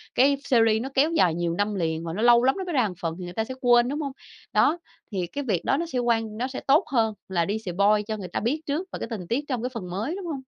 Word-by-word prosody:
cái 275 +2 +4
series 225 -4 +3
nó 265 - -4
kéo 295 +5 +3
dài 180 - +3
nhiều 170 -1 -1
năm 205 +3 -1
liền 165 -2 -1
và 165 -1 -4
nó 210 - -3
lâu 240 0 +6
lắm 265 - +3
nó 380 - -3
mới 350 -3 -4
ra 250 -6 +3
một 185 - -6
phần 165 -1 -2
thì - - -6
người 175 0 -7
ta 220 - -1
sẽ 260 - -6
quên 240 -1 +5
đúng 295 +2 -2
hông? 280 -2 -3 0.4
Đó, 335 - +4 0.3
thì 185 -3 -2
cái 285 +9 -5
việc 195 -9 -1
đó 270 - +2
nó 335 - -1
sẽ 260 -7 -2
quan 225 -3 0
nó 250 +2 -1
sẽ 260 - -6
tốt 295 +7 +5
hơn 225 -4 +2 0.2
là 170 -3 +1
đi 205 +2 -1
spoil 200 +2 +2
cho 215 -1 -2
người 190 -3 -6
ta - - -3
biết 285 +8 -1
trước 320 +7 -2
và - - -5
cái - - -4
tình 190 -7 -5
tiết 275 +5 -1
trong 250 -4 -2
cái 250 - -1
phần 185 -6 -6
mới, 220 - -3
đúng 390 -2 -6
hông? 290 -5 -3
230 Hz, 310 wpm, -25 LUFS, 195-270 Hz, 0.4 s, lâu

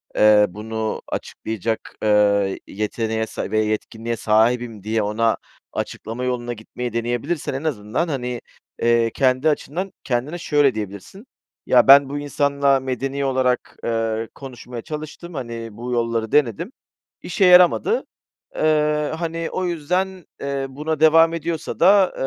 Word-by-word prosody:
eee, 105 -1 +6
bunu 110 +2 -4
açıklayacak, 110 +1 -4
eee, 100 -2 +3
yeteneğe 110 +2 -2
sa - - -5
ve 110 - +2
yetkinliğe 110 +2 -2
sahibim." 115 0 +1
diye 110 0 0
ona 110 +2 +1 0.4
açıklama 115 +3 -5
yoluna 120 -1 -2
gitmeyi 120 +1 -6
deneyebilirsen 120 +8 -2
en 135 +3 -4
azından, 130 +2 -1
hani, 125 -5 -3 0.4
eee, 115 -1 +3
kendi 130 +3 +2
açından 175 +6 -2
kendine 135 +7 -2
şöyle 145 -6 +2
diyebilirsin. 105 - -7 0.4
"Ya, 125 0 +4
ben 140 0 +8
bu 145 +1 -3
insanla 140 -1 +1
medeni 135 +2 -3
olarak, 130 -2 0
eee, 115 -1 -1
konuşmaya 125 -3 -8
çalıştım. 155 +4 -7
Hani, 115 -4 -5
bu 120 +2 -5
yolları 115 -2 -1
denedim. 145 - +1 0.5
İşe 195 - +1
yaramadı." 180 - +5 0.5
Eee, 150 -1 +1
hani, 165 0 -3
o 185 - -2
yüzden, 180 +2 -2 0.2
eee, 140 -1 -2
buna 150 +3 -3
devam 165 +1 +6
ediyorsa 165 -1 -4
da, 190 +1 +5
125 Hz, 130 wpm, -21 LUFS, 115-150 Hz, 0.5 s, ben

